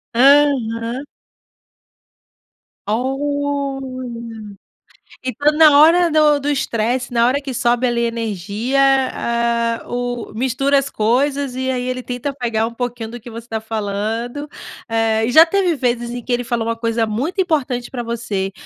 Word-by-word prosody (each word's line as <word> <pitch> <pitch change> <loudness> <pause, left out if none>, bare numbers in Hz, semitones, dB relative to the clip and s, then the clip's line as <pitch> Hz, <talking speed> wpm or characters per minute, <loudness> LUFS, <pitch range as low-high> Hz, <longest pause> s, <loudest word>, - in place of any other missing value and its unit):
Aham. 255 -2 +3 1.8
Olha. 260 -4 -3 0.7
Então, 285 +3 +1
na 300 -3 +7
hora 335 +2 +5
do 300 -1 +4
do 285 +1 -2
estresse, 245 -2 -1
na 235 -1 +3
hora 270 +4 +1
que 275 - -5
sobe, 245 0 +1
ali, 235 -1 0
energia, 230 +1 -2 0.4
ah, 235 0 -1
o 245 -1 -4
mistura 265 +3 +1
as 275 0 0
coisas, 265 +4 0
e 260 0 -1
aí, 250 -1 -2
ele 255 0 -3
tenta 250 +3 -4
pegar 230 -4 -1
um 235 - -8
pouquinho 240 -2 -4
do 240 - -7
que 240 +1 -11
você 230 +1 -9
tá 225 -1 -3
falando. 220 +5 -3 0.4
Eh, 225 -1 +1
e 245 - -1
já 320 +5 +8
teve 360 -1 +1
vezes 240 -2 -1
em 245 0 -5
que 250 - -6
ele 245 0 +1
falou 230 -1 -2
uma 230 - 0
coisa 230 -1 -1
muito 290 - -1
importante 265 -8 -1
para 245 -2 -5
você, 220 -5 -3
245 Hz, 150 wpm, -19 LUFS, 230-275 Hz, 1.8 s, já